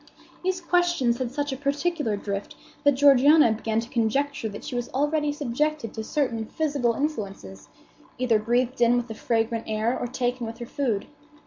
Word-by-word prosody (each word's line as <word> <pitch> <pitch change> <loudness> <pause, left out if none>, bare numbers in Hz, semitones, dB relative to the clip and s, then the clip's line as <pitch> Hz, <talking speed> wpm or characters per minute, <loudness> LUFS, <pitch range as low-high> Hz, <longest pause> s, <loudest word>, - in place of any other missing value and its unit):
These 370 0 -1
questions 345 -9 +2
had 250 -2 -2
such 290 0 -2
a - - -2
particular 285 -4 -1
drift 200 0 -5 0.3
that 285 -1 +5
Georgiana 285 0 +6
began 220 0 -1
to 230 - -9
conjecture 240 +1 0
that 205 - -9
she - - -6
was 245 -1 -2
already 295 +1 +1
subjected 290 -2 -2
to 220 - -5
certain 230 -4 -1
physical 280 -7 0
influences, 200 - -4 0.5
either 240 -3 +2
breathed 240 +3 0
in 240 +1 +5
with 245 0 -2
the - - -4
fragrant 225 0 -1
air 220 +3 0
or 245 - -3
taken 245 -1 -2
with 225 - -7
her 240 - -6
food. 235 -5 -1
245 Hz, 175 wpm, -25 LUFS, 225-290 Hz, 0.5 s, Georgiana